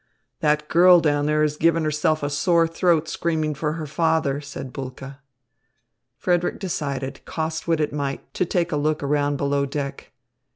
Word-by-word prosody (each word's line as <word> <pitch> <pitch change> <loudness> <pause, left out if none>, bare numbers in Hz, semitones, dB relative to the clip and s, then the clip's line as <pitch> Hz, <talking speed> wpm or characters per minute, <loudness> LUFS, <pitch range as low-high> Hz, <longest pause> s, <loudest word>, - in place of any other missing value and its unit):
"That 150 0 +1
girl 175 +2 +7
down 145 -2 +1
there 150 0 +2
is 150 0 0
giving 165 0 +2
herself 155 0 0
a 145 - 0
sore 165 +3 +3
throat 165 -1 +1
screaming 155 -2 -1
for 150 +1 -2
her 160 -1 -5
father," 155 -2 0
said 140 -3 -8
Bulke. 135 0 -7 1.0
Frederick 175 -1 0
decided, 140 -7 -4
cost 160 0 -4
what 165 -2 +2
it 150 -2 -1
might, 140 -2 -4
to - - 0
take 175 -1 -1
a 150 - 0
look 150 0 0
around 145 0 +1
below 140 0 0
deck. 140 0 -5
150 Hz, 165 wpm, -23 LUFS, 145-165 Hz, 1.0 s, girl